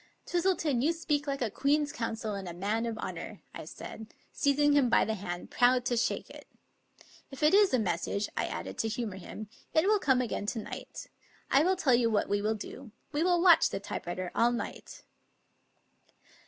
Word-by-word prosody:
"Twistleton, 345 -7 +1
you 315 +5 +2
speak 300 -3 -1
like 275 -2 -1
a 220 - -2
Queen's 290 +5 +1
Counsel 225 -2 -3
and 195 -2 -5
a 170 - -8
man 210 +6 -1
of 225 -1 -4
honor," - - -6
I - - -8
said, 220 0 -9 0.2
seizing 290 +1 +3
him 280 -4 +4
by 235 - +4
the 220 - -1
hand, 175 -4 -6
proud 245 0 +3
to 245 - +1
shake 235 - -1
it. - - -12 0.4
" - - -43 0.4
If 270 +2 -7
it 300 - +5
is 405 -1 +6
a 255 - +3
message," 200 0 -1
I - - 0
added - - -6
to 225 - +1
humor 220 -3 -3
him, 210 +3 -8
" - - -34
it 315 +2 +4
will 420 +1 +4
come 265 -7 +3
again 225 -4 -2
to 225 - -2
night. 215 - -8 0.5
I 275 - +6
will 370 +4 +3
tell 290 -8 +2
you 235 -1 +4
what 215 -2 0
we 205 0 +1
will 215 +1 0
do. 245 +4 -9 0.2
We 295 +1 -1
will 350 0 +3
watch 345 -3 +7
the 195 - -3
typewriter 180 -2 -5
all 235 +1 +3
night." 240 - -6
245 Hz, 205 wpm, -30 LUFS, 215-295 Hz, 0.5 s, watch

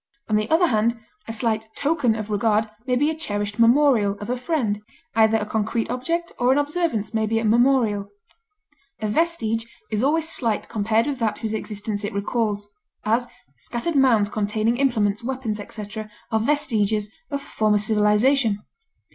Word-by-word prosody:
On 215 - +1
the 215 0 0
other 325 +3 +4
hand, 230 -4 +1 0.3
a - - -3
slight 220 -1 -1
token 285 -6 +1
of 215 -1 -5
regard 215 +1 +2 0.2
may 250 - +2
be 290 +5 +2
a - - -4
cherished 205 -8 -3
memorial 230 -4 +4
of 210 +4 -4
a - - +1
friend; 245 -6 -1 0.3
either 220 0 +4
a 210 - -2
concrete 220 +2 -1
object 335 +8 -2
or 245 +1 +3
an 265 - +3
observance 290 - -1
may 220 -1 +1
be 225 +1 0
a 225 - 0
memorial. 225 -3 +3 0.9
A 215 - -2
vestige 225 -4 0 0.2
is 215 0 0
always 315 +4 +2
slight 230 -9 +1
compared 220 +1 +1
with 285 -3 -3
that 220 -3 0
whose 220 -2 -3
existence 210 -1 -4
it 205 - -4
recalls; 205 0 -1 0.4
as, 235 +3 +1 0.3
scattered 270 +7 -4
mounds 235 -7 +4
containing 215 +3 0
implements, 225 -6 +1
weapons, 245 -4 -3
etc., 215 +1 -7 0.2
are 220 - +2
vestiges 215 -5 +1 0.2
of 280 -2 -2
a - - -13
former 215 -1 +1
civilization. 215 +3 +3
225 Hz, 165 wpm, -23 LUFS, 210-260 Hz, 0.9 s, other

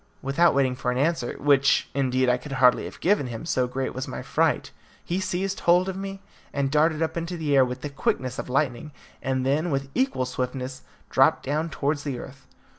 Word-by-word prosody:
Without 140 +6 +3
waiting 130 -2 +2
for 125 - -2
an 125 - 0
answer 145 -3 0
which, 140 -1 +3
indeed, 130 -2 +1
I 125 0 +3
could 135 +3 -8
hardly 125 -2 +4
have - - -9
given 190 -7 +2
him, 120 +5 -6
so 130 -6 +1
great 130 +1 -3
was 130 +1 -4
my - - -6
fright - - +1 0.3
he 175 +2 -1
seized 190 +1 -2
hold 180 +2 +4
of 190 - -3
me, 195 0 -6 0.3
and 140 -1 -1
darted 155 +2 +3
up 160 +1 -2
into 170 +1 -3
the 150 -3 0
air 135 - +7
with 125 0 -4
the 145 - -4
quickness 130 -2 -1
of - - -5
lightning, 140 +1 -1 0.3
and 130 -1 -1
then, 150 +6 +1
with 135 -2 -2
equal 260 - +1
swiftness, 130 +1 -4 0.3
dropped - - +4
down 155 +4 -1
towards 145 -1 -1
the 140 -4 -3
earth. 130 +2 -11
140 Hz, 205 wpm, -25 LUFS, 130-165 Hz, 0.3 s, air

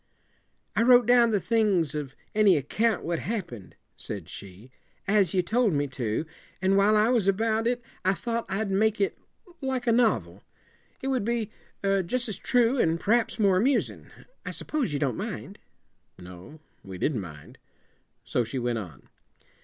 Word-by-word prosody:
"I - - +3
wrote 245 0 +6
down 240 0 +5
the 210 -3 +2
things 195 - +1
of 145 -3 -5 0.2
any 205 -5 +5
account 215 - 0
what 170 -1 -2
happened," 170 - -5 0.2
said 95 -5 -5
she, 100 +7 -11 0.4
"as 200 -4 +3
you 180 - +3
told 220 +2 +2
me 145 0 +1
to, 120 +1 -2 0.3
and 190 +1 +2
while 200 +2 +4
I 215 +2 +4
was 235 -6 +2
about 220 +3 +1
it 245 0 0 0.2
I 190 +1 +2
thought 230 +1 -3
I'd 200 0 -1
make 215 +2 +2
it 200 - +1 0.5
like 260 -2 -2
a 235 - +3
novel. 110 - +1 0.6
It 270 - -1
would 255 -5 0
be 230 -1 -1 0.3
jus' 195 +5 0
as 210 - -4
true, 250 0 +2
and 165 -3 +2
p'r'aps 230 +5 +1
more 200 -4 +3
amusin'. 260 +8 0 0.3
I - - -5
suppose 295 - -2
you 145 - -1
don't 135 -5 -1
mind?" - - -6 0.6
No, 90 - -12 0.2
we 95 -1 -8
didn't 120 +3 -1
mind. 75 -5 -11 0.6
So 125 - 0
she 115 +4 -5
went 120 -2 -1
on. 85 -10 -10
195 Hz, 165 wpm, -27 LUFS, 135-230 Hz, 0.6 s, wrote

